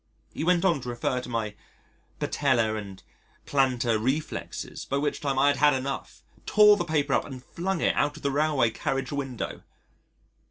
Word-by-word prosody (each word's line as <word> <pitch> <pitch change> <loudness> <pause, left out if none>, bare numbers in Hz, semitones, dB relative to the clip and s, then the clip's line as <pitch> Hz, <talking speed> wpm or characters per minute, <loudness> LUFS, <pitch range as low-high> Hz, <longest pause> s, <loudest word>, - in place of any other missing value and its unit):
He - - -3
went 175 +1 +3
on 170 -7 +2
to 125 - -6
refer 120 +1 -1
to 125 - -9
my 115 -3 -2 0.7
patellar 120 -6 +1
and 100 -3 -7 0.4
plantar 125 -5 +1
reflexes, 140 +5 -3
by 140 - -2
which 145 +1 -1
time 140 -2 -1
I 140 +2 +5
had 145 - +1
had 150 0 +5
enough, 135 +1 -5 0.2
tore 210 -1 +7
the 200 - -1
paper 150 -4 0
up - - +2
and 130 -2 -9
flung 185 +1 -3
it - - +2
out 145 +1 +1
of - - -13
the 140 - +1
railway 145 -5 +2
carriage 135 +5 -2
window. 135 -4 -4
140 Hz, 175 wpm, -27 LUFS, 125-150 Hz, 0.7 s, tore